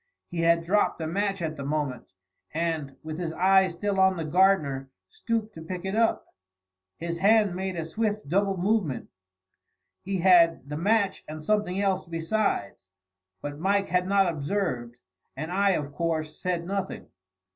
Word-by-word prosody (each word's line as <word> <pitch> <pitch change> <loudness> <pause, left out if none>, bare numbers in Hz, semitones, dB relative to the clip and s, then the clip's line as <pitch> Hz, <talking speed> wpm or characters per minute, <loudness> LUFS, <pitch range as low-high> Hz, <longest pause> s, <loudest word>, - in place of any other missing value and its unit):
He 175 - -4
had 165 0 +3
dropped 200 +3 +1
a 160 - -3
match 195 +2 -1
at 155 -1 -3
the 140 - -5
moment, 140 -4 -2 0.5
and, 160 -4 -2
with 155 +1 -6
his 170 -2 -2
eye 190 +1 +4
still 195 +3 -2
on 190 -1 +4
the 165 - -3
gardener, 155 -6 +2 0.2
stooped 230 - -2
to 160 - -9
pick 180 +3 -6
it 190 - -2
up. 225 +1 +2 0.7
His 170 0 -4
hand 205 0 +4
made 190 0 -3
a 165 -2 -3
swift, 210 +2 -2
double 195 +4 +1
movement, 185 - 0 0.9
he 195 +1 -2
had 170 -5 +5
the 150 - -5
match 200 +4 +1
and 155 0 -7
something 205 -1 0
else 195 -3 0
besides; 165 - -1 0.6
but 145 0 -5
Mike 195 +3 +1
had 180 0 +1
not 195 -1 +4
observed, 145 -7 -2 0.4
and 155 +4 -4
I, 195 +1 +3
of 145 -4 -3
course, 160 -2 -2
said 175 -1 -2
nothing. 195 +1 -3
180 Hz, 160 wpm, -27 LUFS, 160-195 Hz, 0.9 s, had